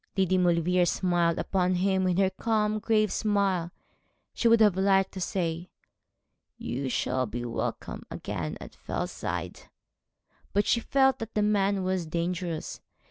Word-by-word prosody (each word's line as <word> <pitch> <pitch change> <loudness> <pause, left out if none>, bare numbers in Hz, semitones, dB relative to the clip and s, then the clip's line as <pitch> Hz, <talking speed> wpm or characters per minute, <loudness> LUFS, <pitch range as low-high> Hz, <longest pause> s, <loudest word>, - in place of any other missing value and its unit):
Lady 190 -1 +2
Maulevrier 180 0 +3
smiled 175 -2 +1
upon 185 -1 0
him 190 +1 +1
with 180 -1 +1
her 190 -1 +3
calm, 215 +1 0
grave 215 -1 +2
smile. 195 -5 0 0.6
She 235 - +1
would 230 0 +6
have 210 -4 +5
liked 195 0 +3
to 190 - -7
say, 175 -1 -2 0.9
'You 130 +2 -3
shall 130 0 0
be 120 +3 -5
welcome 115 - -4
again 90 -7 -5
at - - -10
Fellside,' - - -5 0.8
but 205 +1 +2
she 235 - +2
felt 265 +2 +2
that 225 0 -7
the 210 - +2
man 200 -2 +1
was 185 -2 -1
dangerous. 170 0 -3
185 Hz, 140 wpm, -28 LUFS, 170-205 Hz, 0.9 s, would